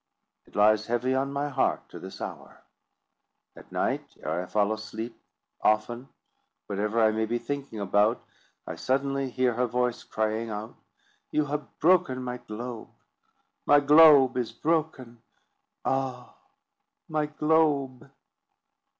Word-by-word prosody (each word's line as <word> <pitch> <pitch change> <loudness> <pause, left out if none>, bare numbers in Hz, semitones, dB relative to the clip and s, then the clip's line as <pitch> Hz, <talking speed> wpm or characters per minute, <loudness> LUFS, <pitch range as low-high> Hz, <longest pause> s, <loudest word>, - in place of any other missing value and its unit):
It - - -22
lies 105 +1 +4
heavy 120 +2 0
on 135 +1 0
my 140 +1 -2
heart 140 - 0
to - - -10
this 95 - -10
hour. - - -8 0.9
At - - -15
night, - - -2
ere 80 +4 -1
I - - -6
fall 105 +1 +1
asleep, 110 +2 -6 0.5
often, 120 +5 0 0.6
whatever 105 +3 -1
I 110 - +5
may 110 0 -1
be 120 +2 0
thinking 135 -1 -5
about, 105 +4 +1 0.4
I - - -6
suddenly 135 0 -1
hear 125 0 +1
her 125 +2 0
voice, 125 0 -1
crying 110 +1 -2
out, 105 +1 -6 0.6
"You 150 - +1
have 145 0 -5
broken 165 -7 +3
my 125 0 -4
globe; 120 0 -7 0.8
my 145 - +7
globe 145 -3 +7
is 120 -3 -1
broken; 150 -7 -2 0.6
ah, 130 -2 -2 0.7
my 155 -1 -1
globe!" 150 -4 +1
125 Hz, 130 wpm, -27 LUFS, 110-140 Hz, 0.9 s, my